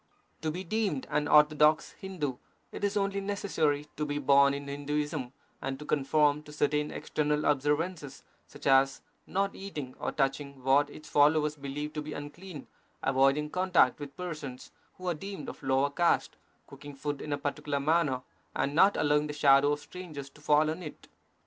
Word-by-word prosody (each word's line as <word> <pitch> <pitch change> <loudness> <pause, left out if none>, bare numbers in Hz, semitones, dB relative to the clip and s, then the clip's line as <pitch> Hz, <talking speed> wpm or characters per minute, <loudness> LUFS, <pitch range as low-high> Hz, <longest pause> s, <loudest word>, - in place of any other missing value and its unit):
To 160 - -1
be 180 +4 -4
deemed 190 -7 -1
an 150 0 +1
orthodox 150 +1 +5
Hindu 155 -10 -4 0.3
it - - -8
is 205 0 +1
only 200 0 0
necessary 165 -8 0
to 150 - -1
be 145 -1 -2
born 140 0 +5
in 140 0 -6
Hinduism 145 -1 -3 0.3
and 135 0 -3
to 150 - -9
conform 150 +1 +2
to 150 - -13
certain 150 0 0
external 150 0 -1
observances, 145 +1 -1 0.2
such - - -13
as 135 0 +4 0.2
not 195 +1 0
eating 150 -10 -7
or - - -2
touching 140 -1 -2
what 140 +2 +4
its 155 - -12
followers 150 +1 +3
believe 145 +1 -5
to 150 - -3
be 150 0 -6
unclean, 150 +2 -8 0.4
avoiding 135 +3 +2
contact 180 -8 +3
with 145 -1 -8
persons 150 -8 -6 0.2
who 185 - -8
are 175 - +2
deemed 195 +5 -7
of - - -8
lower 135 +1 +1
caste, 170 +3 +1 0.3
cooking 145 -1 -11
food 145 0 -4
in 150 - -6
a 145 - 0
particular 145 0 -2
manner, 145 -3 +1 0.3
and 140 - 0
not 190 +6 +5
allowing 150 0 +2
the 150 - -5
shadow 140 -1 +5
of 145 - -3
strangers 155 -7 -9
to 150 - -19
fall 150 +1 +3
on 165 +3 -6
it. 155 -4 -10
150 Hz, 175 wpm, -30 LUFS, 140-155 Hz, 0.4 s, orthodox